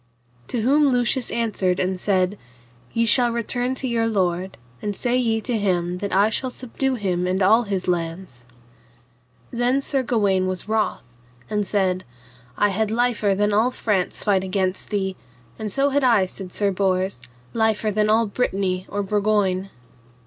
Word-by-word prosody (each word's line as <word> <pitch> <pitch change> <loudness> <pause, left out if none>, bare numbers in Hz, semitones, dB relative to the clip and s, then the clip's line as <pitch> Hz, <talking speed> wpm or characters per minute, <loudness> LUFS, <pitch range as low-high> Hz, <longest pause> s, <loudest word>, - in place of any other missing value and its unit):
To 240 - -1
whom 285 +5 +4
Lucius 245 +1 +1
answered 200 -6 0
and 185 0 -1
said, 190 0 +1 0.5
Ye 230 0 +1
shall 240 +2 +3
return 245 +2 -1
to 260 - -4
your 230 -2 +1
lord, 185 -3 -1 0.2
and 205 -1 -3
say 245 +3 0
ye 225 -3 +1
to 245 +1 -2
him 180 -3 0
that 200 +1 -3
I 200 +3 +3
shall 255 +4 0
subdue 260 +2 -2
him 180 -5 -1
and 185 +1 +1
all 220 +5 +5
his 195 -3 -3
lands. 165 -7 -3 1.1
Then 245 +2 +1
Sir 275 -1 0
Gawaine 200 -6 +1
was 185 +1 -4
wroth 220 -1 0 0.5
and 210 -2 0
said, 185 -2 0 0.5
I 205 - +3
had 210 +2 0
liefer 225 -3 +1
than 205 +1 +1
all 220 +4 +3
France 205 -7 -1
fight 195 -3 +2
against 190 -1 -1
thee; 190 -2 -2 0.4
and 215 -1 -3
so 280 +5 +1
had 285 0 +1
I, 230 -7 +4
said 185 0 -9
Sir 200 +1 0
Bors, 185 -4 0 0.3
liefer 220 -1 +1
than 210 +1 +1
all 225 +2 +4
Brittany 195 -4 -1
or 205 0 -2
Burgoyne. 200 -2 +1
205 Hz, 165 wpm, -23 LUFS, 190-235 Hz, 1.1 s, all